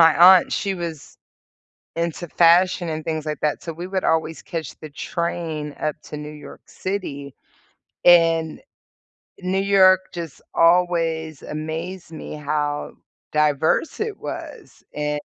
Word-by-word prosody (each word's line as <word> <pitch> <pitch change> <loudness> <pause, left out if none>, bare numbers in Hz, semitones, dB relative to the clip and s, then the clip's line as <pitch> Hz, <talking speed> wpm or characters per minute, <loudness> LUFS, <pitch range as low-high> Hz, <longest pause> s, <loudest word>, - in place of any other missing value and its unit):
my 165 -2 +7 0.2
aunt, - - -5
she 195 -1 -1
was 165 -5 -7 0.8
into 170 +1 -3
fashion 175 +1 +4
and 155 0 -4
things 155 -1 -3
like 150 -1 -3
that, 150 - 0
so 165 - -5
we 175 +3 -6
would 190 0 -2
always 160 0 0
catch 165 -2 -6
the 155 - -9
train 160 -1 -4
up 155 -1 -1
to 150 - -8
New 150 0 -7
York 150 -2 -11
City, 145 -8 -5 0.7
and 165 -2 +5 0.8
New 185 +1 -1
York 190 -2 +6
just 170 -4 -7
always 165 -3 +2
amazed 160 +3 -5
me 155 - -7
how 150 0 -2 0.4
diverse 150 - +1
it 430 -1 -3
was, - - -8
and 150 0 -2
165 Hz, 135 wpm, -22 LUFS, 150-175 Hz, 0.8 s, my